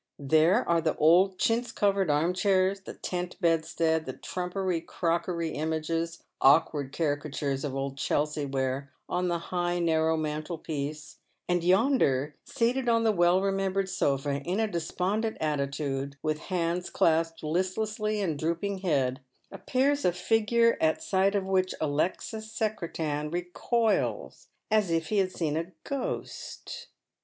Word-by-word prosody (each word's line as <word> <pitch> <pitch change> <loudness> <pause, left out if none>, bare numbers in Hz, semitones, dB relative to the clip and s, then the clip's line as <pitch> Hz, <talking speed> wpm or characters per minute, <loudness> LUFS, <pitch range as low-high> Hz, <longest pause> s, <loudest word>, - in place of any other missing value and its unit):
There 160 - +3
are 170 -1 +3
the 160 -1 0
old 185 +5 +4
chintz 230 +3 +1
covered 195 -5 +1
arm 155 +5 +2
chairs, 190 +1 +2
the - - -9
tent 180 -1 -4
bedstead, 165 -2 +1
the - - -3
trumpery 180 -1 -2
crockery 170 0 -1
images 160 +2 -2
— - - -53
awkward 140 0 +4
caricatures 145 -3 -2
of 140 -3 -3
old 135 0 -3
Chelsea 150 0 0
ware 135 0 -2
— - - -51
on 180 0 0
the 175 -1 +1
high 175 +1 -2
narrow 160 -1 +2
mantelpiece; 155 -1 -4 0.3
and 175 -1 +1
yonder, 180 - +3
seated 245 +2 0
on 230 -1 +3
the 225 - +4
well 175 -1 +3
remembered 195 0 0
sofa, 140 -5 0
in 180 +8 -2
a 225 - +3
despondent 200 +5 -2
attitude, 140 -2 -2
with 155 -1 0
hands 175 0 -1
clasped 165 0 +1
listlessly 210 +6 -1
and 160 -7 -1
drooping 170 +5 -1
head, 135 -8 0 0.3
appears 280 +2 0
a 180 - +4
figure 225 +5 +2
at 160 0 +2
sight 195 +1 +2
of 195 -2 0
which 185 -1 +1
Alexis 185 +8 -2
Secretan 165 -9 -2
recoils 215 - -1 0.2
as 215 -4 +3
if 165 -1 0
he 210 - +2
had 185 -1 +1
seen 155 -5 -2
a 165 +3 -3
ghost. 280 -2 -5
170 Hz, 140 wpm, -28 LUFS, 155-195 Hz, 0.3 s, old